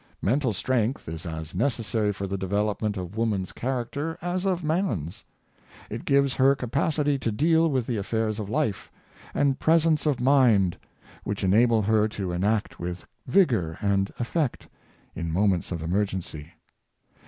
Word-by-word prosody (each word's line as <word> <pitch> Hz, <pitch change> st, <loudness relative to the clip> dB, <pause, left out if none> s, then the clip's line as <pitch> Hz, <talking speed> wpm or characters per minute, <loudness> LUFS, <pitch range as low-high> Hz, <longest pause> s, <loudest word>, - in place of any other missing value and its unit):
Mental 130 Hz, +3 st, +2 dB
strength 120 Hz, +4 st, -1 dB
is 80 Hz, +1 st, -6 dB
as 80 Hz, -1 st, -6 dB
necessary 110 Hz, -1 st, 0 dB
for 100 Hz, 0 st, -4 dB
the 100 Hz, 0 st, -3 dB
development 105 Hz, +2 st, -1 dB
of 90 Hz, +2 st, -6 dB
woman's 105 Hz, -5 st, -1 dB
charac 125 Hz, -1 st, -3 dB
ter 160 Hz, +3 st, -3 dB
as 180 Hz, +2 st, -2 dB
of 180 Hz, -2 st, 0 dB
man's. 150 Hz, -, -1 dB, 0.7 s
It 115 Hz, +2 st, -5 dB
gives 140 Hz, -1 st, +3 dB
her 135 Hz, +1 st, +4 dB
capacity 140 Hz, +3 st, 0 dB
to 115 Hz, -3 st, -1 dB
deal 160 Hz, +7 st, +3 dB
with 130 Hz, -5 st, 0 dB
the 120 Hz, -2 st, -2 dB
affairs 110 Hz, +1 st, -1 dB
of 100 Hz, -2 st, -5 dB
life, 120 Hz, -6 st, -1 dB, 0.4 s
and 140 Hz, -2 st, +2 dB
presence 160 Hz, -2 st, +3 dB
of 140 Hz, -4 st, +1 dB
mind, 120 Hz, -9 st, +4 dB, 0.5 s
which 100 Hz, 0 st, -3 dB
enable 110 Hz, +3 st, +4 dB
her 110 Hz, +1 st, +3 dB
to 100 Hz, -4 st, -4 dB
act 105 Hz, +4 st, 0 dB
with 90 Hz, +1 st, -5 dB, 0.2 s
vigor 115 Hz, -, +2 dB
and 100 Hz, -1 st, +1 dB
effect 130 Hz, +3 st, -2 dB, 0.5 s
in 85 Hz, -1 st, -4 dB
moments 95 Hz, 0 st, +1 dB
of 85 Hz, -3 st, -3 dB
emergency. 90 Hz, -4 st, -2 dB
110 Hz, 150 wpm, -26 LUFS, 95-140 Hz, 0.7 s, her